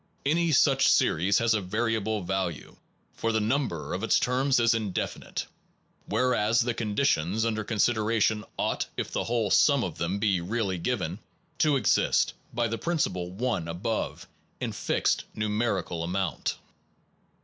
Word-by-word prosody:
Any 165 +3 +2
such 140 - +4
series 95 +5 +3
has 115 -1 +3
a 110 - +1
variable 110 +1 -1
value, 90 -6 -3 0.4
for 115 - -1
the 110 - +1
number 110 - -1
of - - -3
its - - +3
terms 130 +1 +2
is 115 0 +4
indefinite; 110 -5 -3 0.6
where 125 +4 +1
as 110 +1 +2
the 120 0 0
conditions 110 - 0
under 110 -1 -1
consideration 110 0 +1
ought, - - -1
if - - -3
the - - -2
whole 115 -4 0
sum 140 -4 +5
of 85 -3 -5
them 85 +4 -1
be 100 -4 +1
really 95 -1 -2
given, 90 -3 -2 0.4
to 150 -1 +4
exist - - +2 0.2
(by 120 0 0
the 115 +1 -3
principle, 95 - -1
1, 95 -3 -2
above) 90 +7 -3 0.3
in - - -2
fixed - - 0
numer 105 -2 0
ical 85 -2 -5
amount. 90 +1 -2
110 Hz, 150 wpm, -27 LUFS, 95-120 Hz, 0.6 s, sum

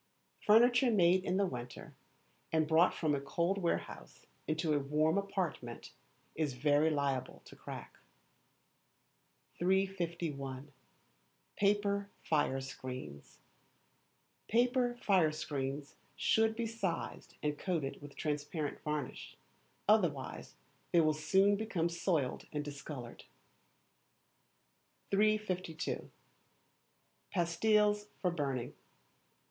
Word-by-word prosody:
Furniture 240 +4 +5
made 185 -4 +4
in 185 0 0
the 200 - +3
winter, 125 -7 -7 0.6
and 160 -1 +2
brought 165 +3 +5
from 155 -3 +1
a 140 - 0
cold 170 +7 0
warehouse 170 -3 -3 0.2
into 155 0 +1
a 145 - +3
warm 150 +4 +2
apartment, 185 -12 -3 0.4
is 155 -4 -1
very 145 +4 +3
liable 140 -4 -1
to - - -13
crack. - - -9 1.6
351. 170 -7 -1 0.8
Paper 200 0 +1
Fire 145 -4 +1
Screens 130 - -8 2.8
should 220 0 +3
be 235 0 -1
sized 210 -7 -4
and 150 -1 -1
coated 160 -8 -2
with 145 -1 -11
transparent 150 0 -3
varnish, 150 -3 -4 0.5
otherwise 175 -11 +1 0.4
they 170 - +5
will 155 -1 +3
soon 195 +6 +3
become 200 -6 -1
soiled 170 -5 -1
and 150 -1 -3
discoloured. 140 -4 -8 1.9
352. 195 -6 0 1.2
Pastilles 210 +4 +2
for 180 - +1
Burning. 140 -7 -2
165 Hz, 90 wpm, -34 LUFS, 145-195 Hz, 2.8 s, Furniture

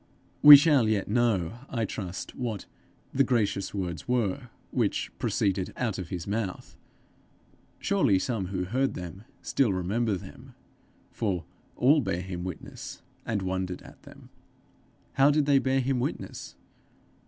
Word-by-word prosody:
We 145 -1 +13
shall 140 -6 +3
yet 105 -3 0
know, 110 -3 +1
I 115 -4 -1
trust, 95 -3 -6
what 115 -6 -4 0.5
'the 135 - +4
gracious 105 -6 0
words' 90 -5 -4
were 120 -7 -1 0.2
'which - - -1
proceeded 95 -2 0
out 115 -6 -2
of 90 -3 -6
his 85 -3 -4
mouth': 100 -2 -4 1.0
surely 140 - +2
some 100 -1 -2
who 90 -1 -2
heard 130 +8 0
them, 90 +4 -8 0.2
still 130 -7 +1
remember 100 +4 0
them, 90 - -11 0.6
for 95 -7 -2 0.3
'all 145 +5 +4
bare 95 -6 -2
him 90 -1 -5
witness, 90 -3 -8 0.2
and 105 -4 -1
wondered 95 -1 -3
at' - - -15
them! - - -15 0.8
How 135 +1 +5
did 150 0 +2
they 140 -1 +4
bear 135 0 +1
him 130 0 0
witness? - - -5
105 Hz, 140 wpm, -28 LUFS, 95-125 Hz, 1.0 s, We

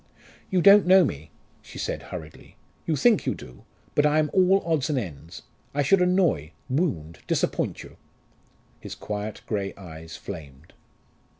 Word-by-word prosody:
"You 180 -2 +1
don't 200 -1 +7
know 185 -1 +7
me," 75 - -5 0.3
she - - -12
said - - -3
hurriedly: 80 -3 -10 0.3
"you 160 - +1
think 215 - +3
you - - +1
do. 60 - -13 0.3
But 145 - +3
I 150 +1 +2
am 155 -1 +1
all 190 +1 +4
odds 160 -3 0
and 145 - 0
ends. 80 - -6 0.3
I 145 - +2
should 180 +7 +4
annoy 175 - +2 0.2
wound 100 - -1
disappoint - - -1
you." - - -14 0.8
His - - -8
quiet 105 0 -5
grey 100 -3 -3
eyes 80 -4 -10
flamed. 75 -5 -10
130 Hz, 155 wpm, -25 LUFS, -, 0.8 s, don't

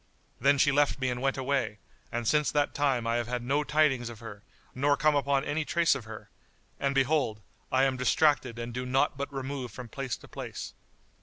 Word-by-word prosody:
Then 140 +1 +4
she 145 +1 +4
left 145 +1 +2
me 130 -1 0
and 125 0 -4
went 135 0 0
away; 130 -5 -1 0.3
and 120 -1 -2
since 150 +2 +3
that 145 -1 +1
time 135 -5 +1
I 115 +1 +1
have 120 -1 -2
had 120 0 -3
no 140 +4 +1
tidings 140 -6 +2
of 120 - -9
her 110 -3 -9 0.3
nor 140 +2 +2
come 155 +1 +3
upon 140 -1 +1
any 150 +2 -1
trace 170 +2 +3
of 135 -5 -5
her; 110 -1 -10 0.5
and 140 0 0
behold, 135 -5 +2 0.3
I 130 0 +3
am 135 -1 +2
distracted 125 0 +2
and 120 0 -5
do 125 +1 -3
naught 135 +4 +1
but 140 +1 -4
remove 135 -2 -4
from 125 +1 -9
place 130 -2 -4
to - - -15
place." - - -7
135 Hz, 210 wpm, -29 LUFS, 120-145 Hz, 0.5 s, Then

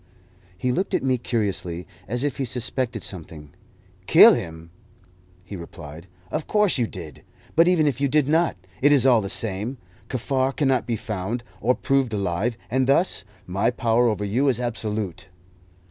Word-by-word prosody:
He 125 +6 0
looked 185 +10 -1
at - - -1
me 130 -2 +1
curiously, 95 -7 -2 0.2
as 125 +5 -2
if 145 -3 -1
he 135 - -1
suspected 125 -1 -1
something. 80 -5 -9 0.6
"Kill - - +9
him?" 80 0 -5 0.7
he 100 - -8
replied. 85 -1 -10 0.2
"Of 155 0 -3
course 210 -8 +3
you 120 - +1
did. 85 -8 -9 0.3
But 165 +1 +5
even 175 -4 +4
if 140 -3 0
you 140 - +3
did 145 0 +2
not, 165 - +2 0.2
it 145 +2 +5
is 140 -3 +5
all 120 -4 +5
the 100 - -5
same. 110 +5 -3 0.3
Kaffar 130 +1 0
cannot 135 -4 +1
be 120 - 0
found, 110 +2 -4 0.2
or 125 +4 +2
proved 135 -4 0
alive, 100 +4 -1
and 130 +1 +1
thus 140 - +2 0.2
my 100 +5 0
power 120 -1 +2
over 105 -1 -2
you 120 +8 +1
is 125 -3 +2
absolute." 110 -6 -3
120 Hz, 165 wpm, -23 LUFS, 100-135 Hz, 0.7 s, Kill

